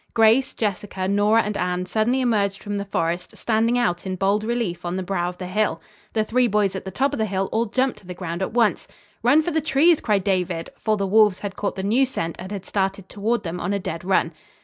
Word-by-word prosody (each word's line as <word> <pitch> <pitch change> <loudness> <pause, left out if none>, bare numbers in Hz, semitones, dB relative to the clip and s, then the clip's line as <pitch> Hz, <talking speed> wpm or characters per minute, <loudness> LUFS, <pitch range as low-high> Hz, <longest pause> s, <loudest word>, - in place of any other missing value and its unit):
Grace, 225 +4 +4
Jessica, 195 -3 -2
Nora 205 +3 +3
and 210 0 -3
Anne 180 -1 -1
suddenly 220 +7 +1
emerged 205 -5 0
from 205 -1 -3
the 200 - -3
forest, 175 -2 -2
standing 230 +1 +1
out 175 -8 0
in 190 -1 -3
bold 200 +3 +1
relief 220 -7 -2
on 175 +1 -3
the 190 - -2
brow 175 -1 -1
of 180 - -9
the 180 - -6
hill. 185 -2 0 0.3
The 220 - +2
three 250 +3 +2
boys 205 -3 +1
at 190 - -5
the - - -4
top 270 +9 0
of 285 - -3
the 220 - +1
hill 195 -1 -1
all 230 +1 +1
jumped 255 0 0
to 195 - -19
the 180 - -6
ground 175 0 -5
at 190 - -1
once. 230 -2 +1 0.3
"Run 310 +2 +4
for 345 - -2
the 315 - +1
trees," 315 +3 +4
cried 205 -4 +1
David, 180 -4 -1
for 215 -1 0
the 200 - -1
wolves 210 -1 +4
had 200 -2 -5
caught 200 - -2
the 190 - -4
new 240 +7 +3
scent 165 -10 -3
and 185 - -7
had 200 -3 -5
started 195 -1 -2
toward 225 +2 -1
them 175 0 -4
on 185 +4 -1
a 200 - 0
dead 165 -3 -5
run. 180 -3 +1
200 Hz, 245 wpm, -23 LUFS, 185-225 Hz, 0.3 s, Grace